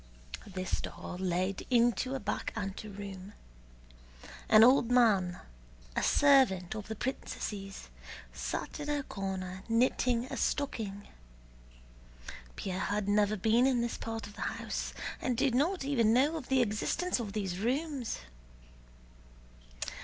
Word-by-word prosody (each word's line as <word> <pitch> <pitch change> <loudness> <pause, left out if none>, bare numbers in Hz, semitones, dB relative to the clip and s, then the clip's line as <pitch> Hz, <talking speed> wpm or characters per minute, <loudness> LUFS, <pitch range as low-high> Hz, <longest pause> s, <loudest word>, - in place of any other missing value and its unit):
This 185 -2 -3
door 180 - -7
led 185 +1 0
into 245 +1 +3
a - - -2
back 210 - -3
anteroom. 200 -1 -6 1.2
An 215 0 +8
old 245 -1 +6
man, 205 -8 +3 0.5
a - - +1
servant 260 -12 +4
of 215 -1 -6
the 220 - -4
princesses, 200 -5 -5 0.5
sat - - -4
in 295 0 -4
a 290 -1 0
corner 190 -4 -4
knitting 240 +1 +2
a - - -6
stocking. 210 -8 -2 1.5
Pierre 185 -1 -3
had 205 0 -1
never 205 +1 +3
been 225 +6 +4
in 250 -3 +2
this 235 0 -2
part 225 -1 -4
of 205 - -11
the - - -10
house - - -3 0.3
and 250 -2 0
did 270 -1 +2
not 315 +7 +1
even 235 -6 +3
know 280 +6 +3
of 305 -6 -5
the 265 -2 +4
existence 245 - 0
of 210 -4 -4
these 190 -4 -2
rooms. 265 - -1
220 Hz, 130 wpm, -31 LUFS, 195-255 Hz, 1.5 s, An